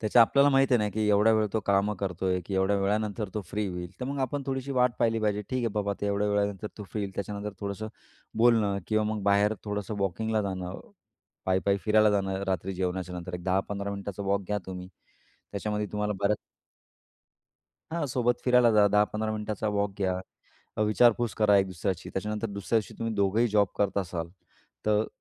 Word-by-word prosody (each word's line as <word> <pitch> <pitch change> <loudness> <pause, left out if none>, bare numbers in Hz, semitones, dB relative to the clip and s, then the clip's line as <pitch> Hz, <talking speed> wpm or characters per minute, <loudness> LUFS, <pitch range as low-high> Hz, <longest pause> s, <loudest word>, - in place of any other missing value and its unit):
त्याच्या 115 +2 +6
आपल्याला 140 +5 +4
माहीत 135 0 +4
आहे 125 - +6
ना 105 -1 +1
की 110 0 +1
एवढ्या 105 +2 +5
वेळ 110 -1 +2
तो 110 - +1
कामं 100 +1 +2
करतोय 95 -1 -1
की 100 - -3
एवढ्या 95 +2 +2
वेळानंतर 105 +1 -1
तो 105 - -1
फ्री 105 0 -1
होईल, 90 -2 -5
तर - - -2
मग 140 +2 -3
आपण 135 +2 -1
थोडीशी 135 0 -2
वाट 125 -1 +3
पाहिली 115 -1 +2
पाहिजे. 105 -1 0
ठीक 130 - 0
आहे 120 -2 +1
बाबा 100 -1 0
ते 105 - -1
एवढ्या 100 +1 +1
वेळानंतर 100 0 0
तो 105 - -6
फ्री 105 - -3
येईल 100 -1 -5
त्याच्यानंतर 100 +2 -4
थोडंसं, 100 +1 -4 0.5
बोलणं 110 -4 +4
किंवा 110 0 +1
मग 105 - -4
बाहेर 100 +2 +3
थोडंसं 105 0 -3
वॉकिंगला 110 +3 0
जाणं. 95 -2 -4 0.7
पायी-पायी 95 +1 +2
फिरायला 110 0 +5
जाणं 95 -1 0
रात्री 95 0 -1
जेवणाच्यानंतर. 90 -1 -3
एक 90 - -6
10-15 100 +2 -1
मिनिटाचा 100 0 -5
वॉक 100 0 +1
घ्या 105 +1 0
तुम्ही 90 -1 -7 0.6
त्याच्यामध्ये 105 +1 -2
तुम्हाला 105 0 -1
बऱ्याच 100 +1 +2 1.6
हां, 170 -3 0
सोबत 120 0 +1
फिरायला 125 -1 +5
जा, 105 -1 +5
10-15 105 +1 +2
मिनिटाचा 110 0 -3
वॉक 100 0 +1
घ्या, 95 -2 0 0.6
अ, - - +1
विचारपूस 115 +2 +3
करा 105 -2 +4
एक 95 - +3
दुसऱ्याची. 95 0 -3
त्याच्यानंतर 105 +3 -2
दुसऱ्याशी 100 +2 -1
तुम्ही 115 -1 -2
दोघंही 100 +4 +2
जॉब 105 -2 +3
करत 100 -1 +1
असाल 85 -3 -3 0.6
तर 105 0 +2
105 Hz, 185 wpm, -28 LUFS, 95-110 Hz, 1.6 s, त्याच्या